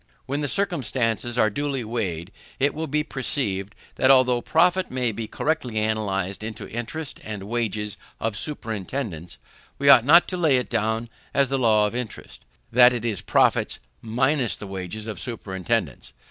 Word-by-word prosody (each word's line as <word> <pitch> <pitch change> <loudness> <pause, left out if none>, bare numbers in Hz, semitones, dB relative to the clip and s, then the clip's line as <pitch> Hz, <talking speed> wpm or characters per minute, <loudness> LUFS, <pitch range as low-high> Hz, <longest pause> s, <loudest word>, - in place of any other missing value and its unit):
When 140 +3 -2
these 145 - -1
circumstances 125 - 0
are 110 -3 +3
duly 140 +1 -2
weighed, 100 -6 -3 0.3
it 140 +2 +2
will 160 +1 -4
be 150 +2 0
perceived, 105 -8 -2 0.2
that 130 - +3
although 125 -2 +5
profit 180 +5 +2
may 125 -2 0
be 110 +1 -5
correctly 140 -7 -2
analyzed 105 -3 -1
into 110 -1 -6
interest 120 +7 -5
and 105 -3 -6
wages 105 -2 -2 0.2
of 115 -2 -2
superintendance, 110 - -4 0.4
we 140 0 +3
ought 130 -4 +9
not 165 +7 +6
to 185 - -3
lay 155 -7 +3
it 125 - -3
down 110 +2 0 0.3
as 140 -2 +3
the 135 0 0
law 110 -3 +4
of 105 - -2
interest, 125 -2 -7 0.3
that 125 +1 +7
it 120 -1 -3
is 110 -5 -1
profits - - +2 0.2
minus 125 +3 +1
the - - -7
wages 95 +2 -6
of 110 -2 -5
superintendance. 95 -7 -3
120 Hz, 160 wpm, -24 LUFS, 105-135 Hz, 0.4 s, ought